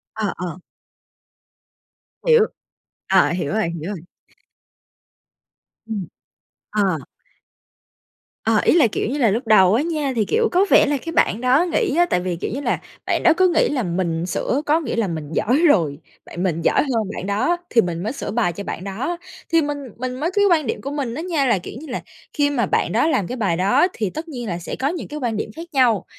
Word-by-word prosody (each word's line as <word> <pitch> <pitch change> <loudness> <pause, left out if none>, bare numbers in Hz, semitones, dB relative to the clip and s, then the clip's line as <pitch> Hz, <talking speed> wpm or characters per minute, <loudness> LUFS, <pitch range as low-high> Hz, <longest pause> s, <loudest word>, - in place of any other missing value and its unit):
À, 215 -3 -1
ờ. 180 0 -5 1.7
Hiểu. 465 -2 +6 0.6
À, 190 -1 +4
hiểu 175 -1 -2
rồi, 215 -6 +1
hiểu 170 +2 -5
rồi. - - -8 1.9
Ừm. 200 -6 -4 0.6
Ờ. 195 -5 +1 1.5
Ờ, 220 -1 +3
ý - - +4
là, 305 -9 +6
kiểu 205 - -2
như 285 - -2
là, 235 -6 +3
lúc 230 +3 -2
đầu 190 -3 +6
á 245 - +3
nha 305 -5 -1
thì, 215 - +1
kiểu, 450 - +1
có 370 +3 +4
vẻ - - +6
là 290 0 0
cái 330 +5 -6
bạn 215 +6 +2
đó 260 +6 +4
nghĩ 295 - +1
á, 350 - +5
tại - - +2
vì, 180 -1 -2
kiểu 170 - -4
như 275 - -3
là, - - 0 0.3
bạn - - 0
đó 340 - +6
cứ 370 - +5
nghĩ - - +3
là 275 -5 -1
mình 170 -2 -1
sửa 255 +8 -1
có 310 +3 +3
nghĩa 275 -8 -3
là 225 -4 +1
mình 155 -3 -5
giỏi 250 - +2
rồi, 160 - +2 0.3
bạn 175 - -5
mình 170 -3 0
giỏi - - +3
hơn 245 -6 0
bạn - - -5
đó, 255 +13 +1
thì 230 - +5
mình 175 -2 -3
mới 220 +6 -2
sửa - - -5
bài 220 -6 +1
cho 200 +4 -6
bạn 180 - -5
đó. 240 - -3 0.3
Thì 330 -1 +4
mình 290 -1 -2 0.2
mình 255 +1 -4
mới 330 +5 -1
cái 405 0 +3
quan 310 -6 +3
điểm - - -2
của 275 - -5
mình 265 -5 -3
á 315 - -4
nha, 330 -6 0
là, 225 -7 +2
kiểu - - -9
như 315 - -10
là, 250 - -4 0.3
khi 290 -1 +2
mà 245 -7 +1
bạn 175 - 0
đó 245 +8 +2
làm 205 - +1
cái 250 - -4
bài 190 -7 0
đó 250 - +3
thì 210 -5 -2
tất 315 - -6
nhiên 245 -6 -6
là 175 -3 -2
sẽ - - -5
có 270 - +1
những 340 +2 -3
cái 300 +1 -6
quan 225 -3 -1
điểm 210 - -4
khác 335 +1 -8
nhau, 245 -7 +3
235 Hz, 220 wpm, -21 LUFS, 190-290 Hz, 1.9 s, Hiểu